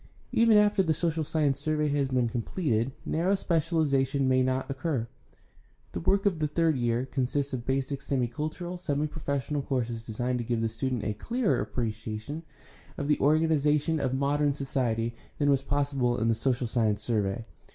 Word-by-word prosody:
Even 230 -2 +5
after 210 -1 +4
the 160 -4 +1
social 165 -1 0
science 145 -3 +1
survey 150 +1 0
has 140 -1 +1
been 130 -2 +1
com 120 0 -2
pleted 120 - 0
narrow 180 +5 +1
specialization 150 -7 +1
may 130 0 +4
not 130 0 0
occur. 135 -3 -2 0.8
The - - -4
work 195 - +2
of 185 -5 +2
the 155 - +1
third 160 +1 +2
year 120 0 0
consists 135 +1 -1
of 120 -2 -4
basic 135 +1 -1
semi 135 -3 0
cultural, 155 +8 -5
semi 145 -3 -1
professional 145 -2 -2
courses 120 -4 -2
designed 120 +3 -2
to - - -2
give 115 0 -1
the 115 - +1
student 125 +1 -2
a 105 - -1
clearer 235 - 0
appreciation 110 +5 -4 0.6
of 145 - -3
the 150 - +3
organization 155 +1 +3
of 130 -2 0
modem 145 +1 +2
society 120 -5 -1 0.2
than 145 -1 +3
was 135 -1 +3
possible 140 -3 0
in 115 - +1
the - - +4
social 125 +2 0
science 110 -3 0
survey. 110 0 -1
135 Hz, 170 wpm, -28 LUFS, 120-155 Hz, 0.8 s, Even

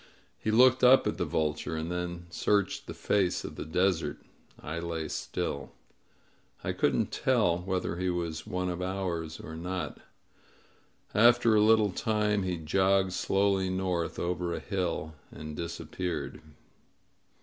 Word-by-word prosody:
He - - -2
looked 130 +3 +5
up 130 +2 +7
at - - -1
the - - +1
vulture, 75 +1 -1
and 80 +2 -3
then 90 -1 -4
searched 100 +2 0
the - - -5
face 95 -4 +1
of - - -7
the - - -6
desert. 90 +1 +1 0.4
I 85 +2 -5
lay 85 -2 -3
still. - - -4 0.9
I - - -1
couldn't - - +1
tell 85 0 +2
whether 90 -1 -2
he 90 +1 0
was 85 -3 -3
one 90 0 -2
of 90 0 -3
ours 90 -4 -3
or 80 - -8
not. 90 +3 -4 1.1
After 120 +1 +5
a 105 - +5
little 110 -1 +5
time 105 0 +1
he 90 -2 -1
jogged 95 +3 +2
slowly 95 0 +1
north 90 -2 -1
over 85 -1 -1
a - - -4
hill 90 -3 -2 0.2
and 75 0 -8
disappeared. 85 +1 -4
90 Hz, 140 wpm, -29 LUFS, 85-100 Hz, 1.1 s, up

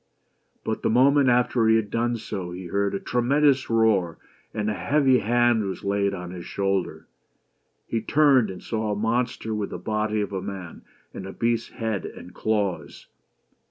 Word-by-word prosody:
But - - -3
the - - +1
moment 135 +3 +4
after 120 -1 +2
he 110 - +5
had 110 -2 0
done 120 +1 0
so, 105 -5 -5
he 90 +1 -7
heard 100 +3 -1
a - - -2
tremendous 135 +4 +2
roar, 110 -7 +2 0.3
and 105 0 -3
a 110 - 0
heavy 130 - +3
hand 120 0 +2
was 95 -1 -5
laid 100 0 +1
on 90 -2 -6
his 90 -1 -7
shoulder. 95 -2 -2 0.8
He 115 - -2
turned, 135 -4 +4
and 90 -1 -8
saw 110 -2 -2
a 100 - -4
monster 115 0 -1
with 105 -2 -2
the - - -5
body 105 +3 -1
of 100 -1 -3
a 95 - -2
man 95 -4 -7 0.3
and 95 - -7
a - - -6
beast's 115 -1 -1
head 110 -4 -3
and 90 - -11
claws. 105 -4 -2
110 Hz, 175 wpm, -25 LUFS, 100-120 Hz, 0.8 s, he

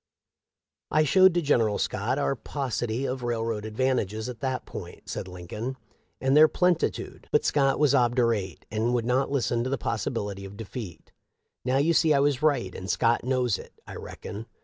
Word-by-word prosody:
' - - -64
I 155 +1 +3
showed 185 +4 +5
to 175 - +2
General 115 -8 +2
Scott 110 +6 -1
our 140 -1 +1
paucity 125 -2 -3
of 130 0 -3
railroad 115 -3 -2
advantages 110 -2 -1
at 120 -3 -7
that 130 0 -2
point,' - - -9
said - - -4
Lincoln, 95 +8 -6 0.4
'and 135 +1 +2
their 155 +1 +9
plenitude, 180 +1 0
but 150 - +3
Scott 135 -2 +2
was 145 -2 +3
obdurate 115 - +1
and 115 +3 0
would 120 -2 0
not 130 +3 +1
listen 120 -4 0
to 130 - -2
the 135 - 0
possibility 100 -4 -3
of 100 +1 -9
defeat. 110 -4 -8 0.5
Now 130 +1 +1
you 155 +5 +3
see 155 -2 +4
I - - +4
was 140 -2 +2
right, 135 - +1
and 95 +1 -7
Scott 115 0 +2
knows 125 -4 +1
it, - - -12
I - - -9
reckon. 110 +3 -8
125 Hz, 180 wpm, -27 LUFS, 110-140 Hz, 0.5 s, their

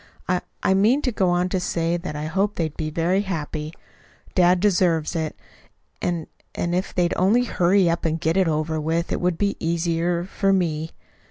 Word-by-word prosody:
"I 180 0 +1 0.2
I 190 - +3
meant 220 +9 +3
to 255 - +1
go 190 -4 +1
on 175 +1 +2
to 185 - 0
say 170 -1 -1
that 170 -3 -5
I 150 +1 -4
hoped 195 +6 0
they'd 160 -3 -2
be 155 -1 -3
very 170 +5 +1
happy. 155 -5 -4 0.6
Dad 180 0 +4
deserves 175 -5 +2
it; 160 -2 -2 0.7
and 170 -2 -1 0.3
and 170 - -1
if 185 +2 -1
they'd 175 -1 +2
only 210 +7 +3
hurry 185 -4 +3
up 170 0 0
and 160 0 0
get 160 +1 0
it 190 -2 +3
over 155 0 -1
with, 165 +2 -1
it - - +1
it - - -6
would 175 -2 +1
be 200 -1 0
easier 170 +1 0
for 195 +1 0
me. 160 -4 0
175 Hz, 195 wpm, -23 LUFS, 160-190 Hz, 0.7 s, Dad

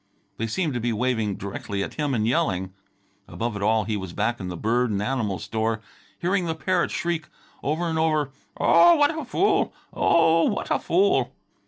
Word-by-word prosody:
They 115 - -2
seemed 155 - -1
to 120 - -1
be 120 +1 -1
waving 110 -3 0
directly 100 0 -4
at - - -6
him 145 -3 -1
and 110 -2 0
yelling. 95 - 0 0.5
Above 115 -1 -3
it 100 - -5
all, 110 +1 +2
he 105 +1 -2
was 95 -3 -5
back 110 +5 -1
in 95 - -5
the 90 -1 -5
bird 120 +5 +1
and 100 -2 -1
animal 105 -3 -1
store, 110 +5 -2 0.4
hearing 185 +1 0
the 160 - -1
parrot 180 +2 0
shriek 170 -2 -2 0.3
over 155 +4 -1
and 160 -1 -1
over, 155 -3 +1 0.3
"Oh, 345 0 +6
what 295 +1 +3
a 315 - -4
fool! 360 +10 +1 0.2
Oh, 165 0 +4
what - - -2
a - - +2
fool!" 390 +3 +2
125 Hz, 190 wpm, -24 LUFS, 105-165 Hz, 0.5 s, Oh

